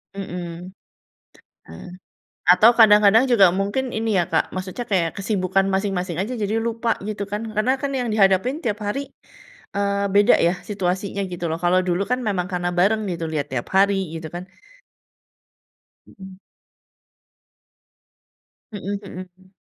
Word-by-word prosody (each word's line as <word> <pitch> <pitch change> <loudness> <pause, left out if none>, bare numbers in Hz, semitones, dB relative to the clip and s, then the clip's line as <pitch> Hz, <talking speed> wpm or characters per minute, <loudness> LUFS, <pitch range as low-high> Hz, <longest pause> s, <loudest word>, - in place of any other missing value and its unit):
Mhm. 180 -2 -6 1.0
Ah. 80 - -11 0.6
Atau 195 +6 +7
kadang-kadang 210 +3 +6
juga 195 -6 +6
mungkin 205 +8 -2
ini, 220 -1 -1
ya, 175 - +3
Kak, - - 0
maksudnya 185 +6 -5
kayak 175 -5 +1
kesibukan 195 -1 0
masing-masing 190 -2 -1
aja, 195 +9 -3
jadi 210 +1 -1
lupa, 230 0 -1
gitu, 210 -1 -4
kan, 210 +2 -3
karena, 250 +5 +2
kan, 275 +1 -4
yang 255 -3 -2
dihadapin 215 - +2
tiap 215 -3 -2
hari, 275 +5 -4 0.7
eee, 200 0 0
beda, 205 0 +6
ya, 170 +2 +3
situasinya, 195 0 -2
gitu, 175 -1 -4
loh, 160 - -2
kalau 180 +1 +3
dulu 180 +2 0
kan, 250 - +1
memang 200 -7 -2
karena 175 -1 -2
bareng, 205 +5 +2
gitu, 165 -1 -5
lihat 150 -3 -2
tiap 120 - -4
hari, 195 -2 +2
gitu, 165 0 -6
kan. 180 +1 -7 1.6
Mhm. 190 -1 -13 2.3
Mhm 205 -3 -7 0.2
mhm, 185 - -9 0.2
mmm. 190 +1 -24
195 Hz, 140 wpm, -22 LUFS, 180-215 Hz, 2.3 s, Atau